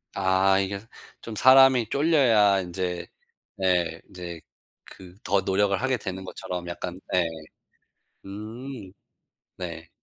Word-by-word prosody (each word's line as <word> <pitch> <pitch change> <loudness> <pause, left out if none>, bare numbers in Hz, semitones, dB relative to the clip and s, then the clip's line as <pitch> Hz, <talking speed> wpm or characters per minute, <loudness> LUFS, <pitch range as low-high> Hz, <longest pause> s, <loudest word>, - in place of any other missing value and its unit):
아 95 0 +3
이게 100 0 -2 0.4
좀 115 -2 -7
사람이 130 -2 +6
쫄려야 120 -10 +4
인제 90 -1 -4 0.5
네 90 -3 0
인제 85 -3 -8 0.4
그 90 -1 -14
더 100 0 +2
노력을 100 +1 +1
하게 130 -1 +1
되는 95 -3 -6
것처럼 90 -1 -6
약간 90 +1 -6
네. 90 -2 +2 1.0
음. 110 +2 -8 0.7
네. 85 -2 -7
95 Hz, 190 characters per minute, -25 LUFS, 90-110 Hz, 1.0 s, 사람이